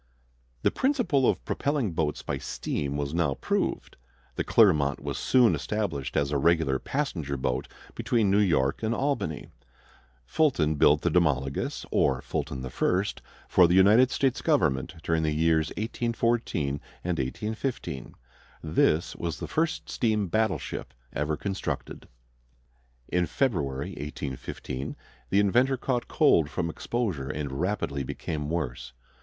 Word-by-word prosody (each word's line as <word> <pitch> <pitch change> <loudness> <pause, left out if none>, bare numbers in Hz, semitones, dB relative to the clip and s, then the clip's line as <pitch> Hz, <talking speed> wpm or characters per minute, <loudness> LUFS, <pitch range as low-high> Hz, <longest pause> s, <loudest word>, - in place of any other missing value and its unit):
The - - +4
principle 245 - +2
of - - -1
propelling 140 -8 0
boats 80 -2 -1
by - - -3
steam 70 0 -3
was 70 0 -3
now 85 -5 +1
proved. - - -2 0.4
The - - -2
Clermont 75 -11 +4
was - - -4
soon 125 -3 +4
established 70 -12 -2
as 70 0 +1
a 70 - +1
regular 80 -4 +2
passenger 85 - -2
boat 65 0 -1 0.3
between 110 -5 +1
New 100 - +4
York 75 -9 +2
and 110 +1 0
Albany. 135 - -2 0.8
Fulton 85 - +2
built 75 0 +4
the 85 - +2
Demologos, 70 -6 0
or 65 -1 +2
Fulton 65 -2 -3
the 65 - -5
First, 95 +9 0 0.3
for 90 - +6
the 90 - +2
United 105 +7 +6
States 135 -1 0
government 75 - +1
during 80 -1 +1
the 80 -1 0
years 80 0 +3
1814 115 - -1 0.2
and 90 -3 -1
1815. 105 - -4 0.5
This 80 +1 +2
was 85 -1 -3
the - - -5
first 160 0 -1
steam 105 -5 0
battleship 110 - -1 0.2
ever 75 +1 -1
constructed. 95 -1 -4 1.0
In 90 -1 +1
February, 70 - -1
1815, 70 -2 -5 0.3
the 100 - +3
inventor 125 +7 +3
caught 125 -1 -1
cold 75 -3 +4
from 85 -1 -2
exposure 95 - -2
and 75 -3 -3
rapidly 90 -7 -1
became 75 +3 -4
worse. 70 -7 -3
85 Hz, 135 wpm, -27 LUFS, 70-110 Hz, 1.0 s, for